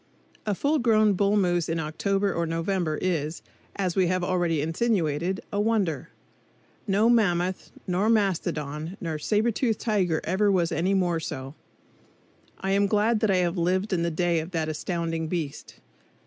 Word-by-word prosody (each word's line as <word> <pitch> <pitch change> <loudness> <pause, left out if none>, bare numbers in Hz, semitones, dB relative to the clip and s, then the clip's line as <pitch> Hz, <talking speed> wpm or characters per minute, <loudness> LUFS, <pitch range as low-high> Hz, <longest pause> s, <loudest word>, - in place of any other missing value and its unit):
A 205 - +1
full 295 +8 +1
grown 215 -4 +4
bull 200 +2 +2
moose 175 -4 +1
in 165 0 -1
October 195 +6 0
or 170 0 -1
November 165 -1 -1
is, 160 -3 -1 0.3
as 185 -3 -1
we 185 -2 +3
have 185 0 0
already 175 -3 +1
insinuated, 170 0 0
a 205 - +1
wonder. 190 -9 0 0.8
No 205 +3 +3
mammoth, 185 -6 +1 0.2
nor 190 +4 +1
mastodon, 165 -6 -1
nor 160 -4 -3
sabretoothed 220 - +1
tiger 185 -8 0
ever 200 +4 +2
was 175 -3 +1
any 185 +5 +1
more 175 -3 +1
so. 135 -4 -6 1.1
I 195 - -1
am 200 +1 +3
glad 215 +2 +2
that 220 - +1
I 190 - +3
have 175 +1 -2
lived 185 +4 0
in 175 - +1
the 170 - +1
day 170 0 +1
of 160 +2 -5
that 160 -2 -1
astounding 165 0 -2
beast. 155 -4 -4
180 Hz, 160 wpm, -26 LUFS, 165-200 Hz, 1.1 s, grown